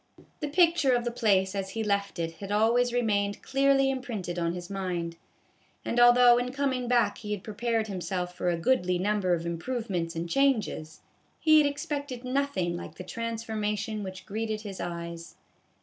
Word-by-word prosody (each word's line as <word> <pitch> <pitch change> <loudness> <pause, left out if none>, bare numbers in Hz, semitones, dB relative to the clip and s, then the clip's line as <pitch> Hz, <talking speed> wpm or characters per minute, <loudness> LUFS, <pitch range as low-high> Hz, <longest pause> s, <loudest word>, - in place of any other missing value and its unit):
The 300 - -2
picture 330 -3 +4
of 240 - 0
the 240 - -1
place 195 -5 +2
as 195 -1 -3
he 225 +3 -3
left 200 -2 -1
it 165 -1 -3
had 200 0 -7
always 230 +4 +3
remained 205 -4 0
clearly 270 0 +3
im 265 -1 -3
printed 190 -8 -4
on 170 0 0
his 175 0 -6
mind; 180 -4 -3 0.7
and 240 - 0
although 240 0 +7
in 250 +1 -2
coming 265 -2 -1
back 235 -4 +2
he 210 -1 -4
had 200 -2 -5
prepared 225 +1 -1
himself 180 -3 -3
for 180 - -1
a 170 - 0
goodly 180 -2 +2
number 190 -1 +1
of 170 0 -5
improvements 175 -1 -3
and 165 +1 -3
changes, 215 - 0 0.4
he 310 -1 +6
had 295 - +4
expected 285 -3 -4
noth 280 +2 -1
ing 175 -1 0
like 165 -2 -8
the - - -8
transformation 220 0 -3
which 185 -1 -7
greeted 215 +1 -3
his 200 -3 -7
eyes. 170 -1 -6
210 Hz, 180 wpm, -28 LUFS, 180-245 Hz, 0.7 s, although